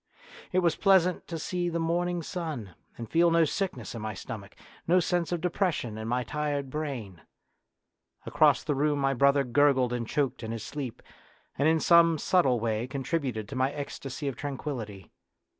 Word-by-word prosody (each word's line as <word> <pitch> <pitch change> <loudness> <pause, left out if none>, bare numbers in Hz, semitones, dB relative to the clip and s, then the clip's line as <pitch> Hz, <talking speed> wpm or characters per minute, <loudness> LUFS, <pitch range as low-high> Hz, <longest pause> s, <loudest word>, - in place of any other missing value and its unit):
It 185 0 +2
was 165 - +3
pleasant 185 -3 +3
to 165 - -4
see 175 +2 -2
the 170 - -2
morning 170 +1 0
sun 155 - -5 0.2
and 115 - -6
feel 170 +7 +4
no 165 -1 +4
sickness 155 - -3
in 115 - -6
my 110 -1 -4
stomach, 100 +1 -8 0.3
no 180 +2 +5
sense 175 -1 0
of 175 -2 -1
depression 175 - -1
in 110 0 -5
my 125 +2 0
tired 145 0 -3
brain. 125 - -5 1.0
Across - - +3
the 150 - 0
room 145 +1 +1
my 135 -1 +1
brother 140 +2 +4
gurgled 130 -1 +3
and 120 -2 -3
choked 140 0 -1
in 110 -1 -5
his 115 -2 -5
sleep, 140 -5 -6 0.5
and 140 - +2
in 160 0 +4
some 165 0 +5
subtle 140 -7 +2
way 110 +1 -1
contributed 135 -5 -2
to 140 - -6
my 130 +1 +1
ecstasy 140 -1 -5
of 135 - -2
tran 145 -2 -5
quillity. 110 - -6
140 Hz, 175 wpm, -28 LUFS, 120-165 Hz, 1.0 s, no